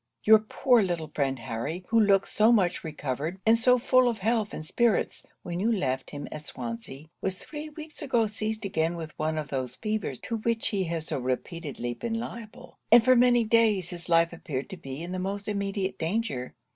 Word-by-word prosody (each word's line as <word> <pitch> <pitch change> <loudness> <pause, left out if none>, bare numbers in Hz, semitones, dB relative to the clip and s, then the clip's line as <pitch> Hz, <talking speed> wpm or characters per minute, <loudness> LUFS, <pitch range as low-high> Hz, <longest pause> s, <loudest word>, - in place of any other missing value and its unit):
Your 220 0 +8
poor 235 +3 +3
little 170 -5 -2
friend 135 -2 0
Harry, 130 +10 -4
who 230 - +4
looked 200 -2 +4
so 220 +2 +4
much 190 -7 +2
recovered, 150 +2 -4
and 225 +1 +6
so 250 +2 +4
full 255 0 +4
of 230 - -2
health 220 +1 0
and 155 - -6
spirits, 235 +5 +1 0.2
when 175 0 -4
you 220 +5 +2
left 130 - -1
him 145 -1 -6
at 155 0 -7
Swansea, 120 +4 -6 0.2
was 190 -1 -1
three 300 +9 -8
weeks 310 0 -9
ago 245 -6 +2
seized 215 0 -3
again 165 -3 0
with 160 -2 -7
one 155 +1 0
of 150 -2 -3
those 130 -3 -3
fevers 215 - -3
to 230 - -3
which 225 +1 0
he 195 -3 -1
has 165 -1 -3
so 140 - -2
repeatedly 130 0 -3
been 225 - -3
liable, 230 -2 -9
and 230 0 +8
for 255 0 +6
many 245 -1 +5
days 220 -5 +3
his 175 0 -6
life 165 0 +4
appeared 140 -5 -5
to 190 - -6
be 135 -1 -7
in 175 - -6
the 185 - -3
most 200 +2 -3
immediate 200 -1 -2
danger. 160 - -2
190 Hz, 200 wpm, -27 LUFS, 155-225 Hz, 0.2 s, Your